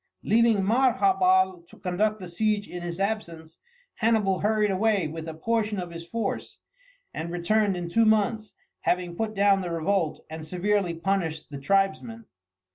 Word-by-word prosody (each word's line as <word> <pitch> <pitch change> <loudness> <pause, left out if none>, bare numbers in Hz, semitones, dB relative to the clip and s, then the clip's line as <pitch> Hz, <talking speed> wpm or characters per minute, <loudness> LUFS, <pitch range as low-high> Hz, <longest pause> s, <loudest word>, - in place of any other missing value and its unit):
Leaving 225 -2 +3
Maharbal 190 -5 +3
to - - -17
conduct 210 +4 -1
the 185 - -7
siege 205 +3 -1
in 175 - -7
his 175 +1 -5
absence, 170 -6 -4 0.4
Hannibal 215 -5 +2
hurried 210 0 +2
away 195 -3 +1
with 160 +1 -7
a 160 - -6
portion 215 +3 -1
of 175 -1 -5
his 170 0 -9
force, 230 +4 -4 0.6
and 165 +1 -4
returned 190 +3 +1
in 175 -1 -4
two 225 +7 +3
months, 215 0 +1 0.2
having 175 -1 -1
put 220 +2 -3
down 200 -1 +4
the 180 - -4
revolt 170 0 -1
and 160 0 -7
severely 180 +2 0
punished 165 -4 -2
the 140 - -6
tribesmen. 195 - 0
195 Hz, 155 wpm, -26 LUFS, 170-215 Hz, 0.6 s, down